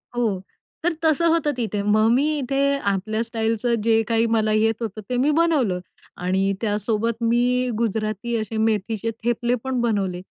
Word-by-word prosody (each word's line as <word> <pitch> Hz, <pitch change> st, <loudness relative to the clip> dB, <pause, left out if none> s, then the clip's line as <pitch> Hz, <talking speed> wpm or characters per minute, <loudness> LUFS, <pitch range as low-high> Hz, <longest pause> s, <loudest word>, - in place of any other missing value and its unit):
हो. 215 Hz, -6 st, 0 dB, 0.4 s
तर 350 Hz, -1 st, +2 dB
तसं 320 Hz, +1 st, +3 dB
होतं 315 Hz, -3 st, +2 dB
तिथे. 215 Hz, -3 st, -2 dB
मग 215 Hz, +2 st, +3 dB
मी 295 Hz, +5 st, +2 dB
इथे 270 Hz, +1 st, -1 dB, 0.3 s
आपल्या 215 Hz, +3 st, -2 dB
स्टाईलचं 230 Hz, +1 st, 0 dB
जे 225 Hz, -1 st, +4 dB
काही 230 Hz, 0 st, +2 dB
मला 215 Hz, -1 st, +1 dB
येत 225 Hz, +1 st, +2 dB
होतं, 215 Hz, -1 st, -4 dB
ते 250 Hz, -, 0 dB
मी 285 Hz, +4 st, +3 dB
बनवलं 290 Hz, -, +2 dB, 0.4 s
आणि 190 Hz, +2 st, 0 dB
त्यासोबत 220 Hz, +2 st, -1 dB
मी 245 Hz, +2 st, +2 dB
गुजराती 220 Hz, +1 st, -2 dB
असे 220 Hz, 0 st, -4 dB
मेथीचे 220 Hz, 0 st, 0 dB
थेपले 240 Hz, +1 st, +1 dB
पण 260 Hz, -2 st, -1 dB
बनवले. 195 Hz, -6 st, -1 dB
225 Hz, 155 wpm, -23 LUFS, 215-245 Hz, 0.4 s, जे